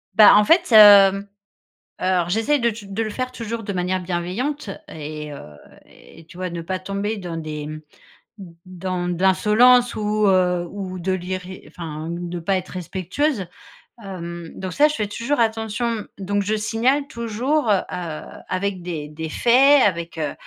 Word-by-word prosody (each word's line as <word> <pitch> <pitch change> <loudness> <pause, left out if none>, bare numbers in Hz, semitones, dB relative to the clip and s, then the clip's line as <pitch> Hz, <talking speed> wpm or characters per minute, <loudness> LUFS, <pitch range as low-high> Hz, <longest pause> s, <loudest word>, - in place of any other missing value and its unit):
Bah 215 -2 +8
en 210 - +5
fait 335 - +3
hem, 200 -3 +8 0.8
heu, - - -3
alors 180 -2 +1
j'essaye 225 +9 +1
de 235 -2 +1
touj 215 -1 -9
de 200 +3 -2
le 215 - -3
faire 255 +3 -4
toujours 230 -2 -5
de 200 - -4
manière 180 +1 -1
bienveillante 185 +10 -3 0.2
et, 150 -1 -7
heu, 140 - -9 0.4
et 165 - -17
tu 170 - -15
vois 185 0 -3
ne 170 -1 -6
pas 185 +2 -3
tomber 200 +3 -3
dans 175 -3 -6
des 155 -2 -5
mmh, 155 0 -7 0.6
d 190 -3 -10 0.2
dans 185 -1 -4
de 180 +1 -3
l'insolence 235 +6 +4
ou, 210 0 0
heu, 180 -2 +2
ou 185 -2 -6
de 190 +2 -2
l'irré 185 0 -5
enfin 160 -2 -7
de 175 0 -5
pas 190 +3 0
être 185 - -8
respectueuse. 190 - -2 0.6
Hem, 170 -3 -7
donc 185 -1 -6
ça, 300 +1 +5
je 300 - -3
fais 210 - -1
toujours 235 +7 -2
attention 225 0 -1
donc 200 +1 -1
je 210 +2 -1
signale 240 +6 0
toujours 235 +4 -1
heu, 200 -3 +3 0.7
avec 185 0 -2
des 160 -4 -5
des 160 +1 -6
faits, 265 - +5
avec, 170 -3 -1
heu, 150 -2 -2
195 Hz, 175 wpm, -21 LUFS, 175-225 Hz, 0.8 s, Bah